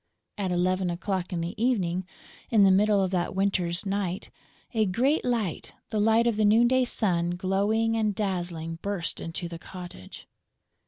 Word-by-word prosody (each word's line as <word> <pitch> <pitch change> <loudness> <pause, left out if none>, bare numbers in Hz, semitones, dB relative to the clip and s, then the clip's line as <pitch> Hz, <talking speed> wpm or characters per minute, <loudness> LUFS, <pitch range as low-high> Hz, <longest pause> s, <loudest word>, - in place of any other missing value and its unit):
At 190 -2 -1
eleven 185 +1 +1
o'clock 185 +1 -3
in 175 -2 -2
the 170 +2 -3
evening, 185 -7 0 0.4
in 215 -3 +5
the 195 - +6
middle 200 +1 +4
of 185 - -1
that 180 0 -1
winter's 185 -2 0
night, 195 -2 -2 0.4
a 220 -2 +2
great 260 - +1
light, 225 -9 -2 0.2
the 215 - 0
light 225 +2 +4
of 235 -3 +1
the 215 - +2
noon 220 +3 +5
day 260 +1 +3
sun, 175 -7 0
glowing 205 +5 +1
and 215 -2 0
dazzling, 175 -5 -2
burst 200 -4 -3
into 165 +1 -5
the 170 -1 -8
cottage. 175 - -10
195 Hz, 165 wpm, -27 LUFS, 175-215 Hz, 0.4 s, the